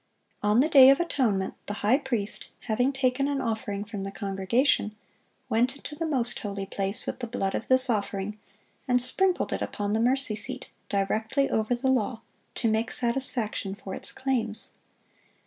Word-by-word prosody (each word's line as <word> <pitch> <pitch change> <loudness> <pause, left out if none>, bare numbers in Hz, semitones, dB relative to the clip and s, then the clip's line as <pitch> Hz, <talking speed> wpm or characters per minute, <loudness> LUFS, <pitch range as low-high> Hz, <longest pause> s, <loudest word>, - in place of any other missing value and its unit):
On 210 +3 +4
the 295 - +3
day 270 -4 +9
of 275 - +5
atonement 230 - 0
the 205 - -3
high 250 +7 +5
priest, 235 -7 -3
having 245 +4 +1
taken 270 0 +1
an 285 -1 -1
offering 220 -4 -2
from 205 -2 -6
the 195 - -3
congregation, 200 +4 +1 0.5
went 245 +2 +2
into 285 - -9
the 325 +2 -3
most 250 -6 0
holy 200 -2 -4
place 195 +2 -2
with - - -4
the 240 - -4
blood 195 -3 -2
of - - -3
this 260 0 +4
offering, 210 -2 -2 0.5
and 250 -1 +4
sprinkled 365 +9 +2
it - - -2
upon 205 0 -2
the 220 - +2
mercy 250 -1 +2
seat, 210 - -5 0.2
directly 220 +7 0
over 220 +3 +1
the 260 +2 0
law, 230 -2 0 0.3
to 235 - 0
make 220 +1 +1
satisfaction 235 -5 0
for 195 -2 -8
its - - -5
claims. 240 -5 -1
230 Hz, 170 wpm, -27 LUFS, 205-260 Hz, 0.5 s, day